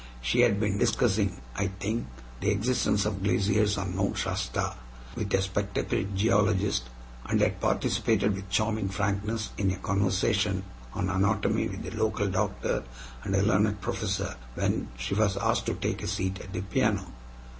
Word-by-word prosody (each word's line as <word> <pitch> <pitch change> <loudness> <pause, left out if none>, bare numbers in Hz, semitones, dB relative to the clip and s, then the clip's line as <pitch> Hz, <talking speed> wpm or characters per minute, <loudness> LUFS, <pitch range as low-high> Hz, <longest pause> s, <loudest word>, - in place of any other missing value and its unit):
She - - 0
had 115 -5 +5
been 105 -2 0
discussing, 110 - +2 0.2
I 100 - 0
think, 100 - -3 0.3
the 100 - +1
existence 105 -1 +2
of 100 -2 -2
glaciers 100 +1 +2
on 95 -2 -3
Mount 100 +1 0
Shasta - - -1 0.4
with 105 -2 -3
a 95 - +3
spectacled 100 0 -1
geologist, 100 - +2 0.4
and - - +2
had - - +1
participated 105 -2 +2
with 95 0 -6
charming 110 -1 +1
frankness 105 +3 -1
in 100 -1 +2
a 95 - -1
conversation 100 0 +1 0.3
on 100 - -1
anatomy 95 +3 +2
with - - -6
the - - -6
local 110 -1 +1
doctor 100 +1 0 0.4
and 95 - -1
a 95 - +3
learned 105 0 +3
professor, 75 - -2 0.2
when - - 0
she 60 +9 -3
was 100 -1 +2
asked 110 +2 +1
to - - 0
take - - -2
a - - -3
seat 95 0 -1
at 95 - -9
the 90 -2 -3
piano. 95 -1 +1
100 Hz, 160 wpm, -28 LUFS, 95-105 Hz, 0.4 s, had